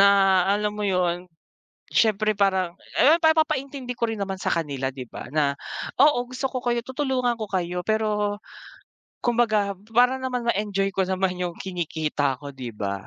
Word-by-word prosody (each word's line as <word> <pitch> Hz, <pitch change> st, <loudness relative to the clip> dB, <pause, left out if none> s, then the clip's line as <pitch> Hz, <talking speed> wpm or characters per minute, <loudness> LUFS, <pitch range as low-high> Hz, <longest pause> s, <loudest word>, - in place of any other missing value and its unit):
na 200 Hz, -, +8 dB, 0.4 s
alam 210 Hz, +1 st, +1 dB
mo 210 Hz, -, -7 dB
'yon, 180 Hz, -2 st, 0 dB, 0.6 s
siyempre 215 Hz, -1 st, +3 dB
parang, 190 Hz, -3 st, +1 dB, 0.2 s
eh, 315 Hz, +4 st, +7 dB
pa 320 Hz, 0 st, +6 dB
papaintindi 275 Hz, -4 st, -1 dB
ko 235 Hz, -, +1 dB
rin 220 Hz, -2 st, -4 dB
naman 195 Hz, -1 st, -3 dB
sa -, -, +1 dB
kanila, 140 Hz, -5 st, -2 dB
'di 130 Hz, -3 st, -8 dB
ba, -, -, -8 dB
na, 145 Hz, -2 st, +2 dB, 0.5 s
"Oo, 260 Hz, -4 st, +4 dB
gusto 255 Hz, +1 st, -4 dB
ko 255 Hz, -, -4 dB
kayo 240 Hz, -1 st, 0 dB
tutulungan 260 Hz, -3 st, 0 dB
ko -, -, -1 dB
kayo." 180 Hz, -1 st, -1 dB
pero 210 Hz, -1 st, 0 dB, 0.9 s
kumbaga 220 Hz, -4 st, +2 dB, 0.2 s
para 250 Hz, +2 st, +5 dB
naman 255 Hz, -2 st, -2 dB
ma-enjoy 195 Hz, -2 st, 0 dB
ko 190 Hz, -1 st, 0 dB
naman 185 Hz, -1 st, -1 dB
'yong 175 Hz, -1 st, -2 dB
kinikita 160 Hz, -6 st, -1 dB
ko, 145 Hz, -1 st, -8 dB
'di 125 Hz, -5 st, -8 dB
ba? 100 Hz, -1 st, -4 dB
200 Hz, 165 wpm, -24 LUFS, 175-245 Hz, 0.9 s, na